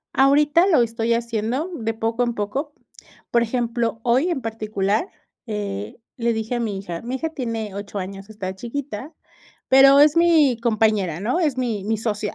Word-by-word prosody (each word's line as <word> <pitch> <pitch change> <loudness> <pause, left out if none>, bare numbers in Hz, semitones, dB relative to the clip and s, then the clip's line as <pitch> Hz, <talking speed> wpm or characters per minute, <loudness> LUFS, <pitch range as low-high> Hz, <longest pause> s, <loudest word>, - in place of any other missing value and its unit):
Ahorita 295 +6 +4
lo 315 -11 +4
estoy 230 0 -1
haciendo 235 - -2
de 225 -4 -3
poco 225 +2 -1
en 240 -1 -2
poco, 265 +9 -3 0.6
por 235 - +3
ejemplo, 235 -1 -1
hoy 255 +8 +2
en 330 - -1
particular, 215 - -1 0.4
eh, 200 - -5 0.2
le 235 -1 0
dije 220 +2 -3
a 240 - -1
mi 210 -4 -2
hija, 175 -4 -6
mi 245 +3 -3
hija 320 +5 -2
tiene 230 -8 -4
8 200 0 -6
años, 195 +2 -7
está 190 -3 -5
chiquita, 260 - -6 0.6
pero 275 +1 +7
es 295 +2 +5
mi 320 -7 +4
compañera, 215 -7 +1
¿no?, 245 - 0
es 295 -7 0
mi 225 -6 -2
mi 220 +1 -1
socia, 210 -2 -3
230 Hz, 170 wpm, -22 LUFS, 210-265 Hz, 0.6 s, pero